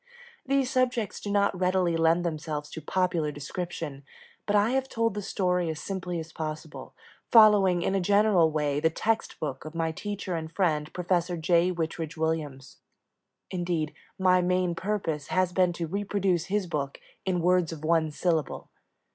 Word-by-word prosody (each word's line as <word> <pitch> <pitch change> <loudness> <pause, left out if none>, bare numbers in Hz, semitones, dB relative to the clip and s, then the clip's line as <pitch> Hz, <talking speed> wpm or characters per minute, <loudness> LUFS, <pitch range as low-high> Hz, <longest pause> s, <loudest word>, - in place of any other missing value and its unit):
These 270 -1 +1
subjects 250 -5 0
do 205 - -6
not 200 -2 +1
readily 180 -2 +2
lend 165 +2 +3
themselves 155 -2 -4
to 160 - -7
popular 175 -2 0
description, 150 -1 -5 0.4
but 205 - +2
I 205 +3 +4
have 265 0 0
told 230 -1 0
the 205 - -4
story 180 -3 0
as 155 -1 -4
simply 180 -2 -4
as 160 0 -8
possible, 155 0 -6 0.4
following 205 -6 +6
in - - 0
a 195 - +1
general 200 -3 +4
way 150 -2 0
the 160 - +3
text 225 +7 -1
book 140 -4 -4
of 155 +2 -9
my 165 -1 0
teacher 200 +2 -5
and 160 -1 -5
friend, 155 -5 0
Professor 180 -1 0
J. 170 +2 +3
Whitridge 165 -2 -4
Williams; 150 -5 -3 0.7
indeed, 175 -4 -1 0.2
my 185 -1 +4
main 180 0 +1
purpose 170 -6 -2
has 185 -1 +1
been 180 -1 +3
to 170 0 -3
reproduce 195 -1 0
his 200 0 0
book 145 -5 -3 0.2
"in 185 -2 0
words 180 -1 +2
of 155 -1 -7
one 160 -1 +2
syllable." 160 -1 -1
175 Hz, 165 wpm, -27 LUFS, 160-190 Hz, 0.7 s, following